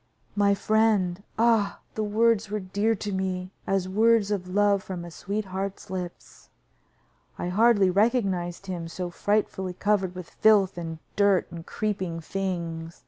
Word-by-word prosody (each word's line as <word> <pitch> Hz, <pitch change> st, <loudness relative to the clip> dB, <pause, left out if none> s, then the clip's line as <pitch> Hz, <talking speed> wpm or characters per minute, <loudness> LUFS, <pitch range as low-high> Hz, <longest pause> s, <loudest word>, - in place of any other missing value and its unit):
"My 200 Hz, -1 st, +3 dB
friend!" 205 Hz, -4 st, +2 dB, 0.2 s
Ah! 220 Hz, -3 st, +2 dB
the 220 Hz, -, -3 dB
words 215 Hz, 0 st, +2 dB
were 210 Hz, +1 st, -2 dB
dear 205 Hz, +4 st, 0 dB
to 205 Hz, 0 st, -5 dB
me 185 Hz, -1 st, -2 dB, 0.2 s
as 195 Hz, -1 st, +1 dB
words 215 Hz, +1 st, +3 dB
of 190 Hz, -3 st, -2 dB
love 200 Hz, +1 st, +2 dB
from 180 Hz, -3 st, -6 dB
a 170 Hz, -, -9 dB
sweetheart's 195 Hz, +1 st, -4 dB
lips. 180 Hz, -2 st, -7 dB, 0.9 s
I 175 Hz, -, -3 dB
hardly 205 Hz, -1 st, +4 dB
recognized 195 Hz, -4 st, +1 dB
him, 185 Hz, -3 st, -4 dB
he -, -, -6 dB
was 165 Hz, -, -9 dB
so 180 Hz, -1 st, -4 dB
frightfully 190 Hz, -1 st, -1 dB
covered 195 Hz, -2 st, 0 dB
with 180 Hz, -2 st, -7 dB
filth 205 Hz, -3 st, +4 dB
and 165 Hz, -2 st, -5 dB, 0.2 s
dirt 200 Hz, -3 st, +3 dB
and 165 Hz, 0 st, -9 dB
creeping 190 Hz, -6 st, -2 dB
things. 170 Hz, -2 st, -4 dB
195 Hz, 150 wpm, -26 LUFS, 180-210 Hz, 0.9 s, hardly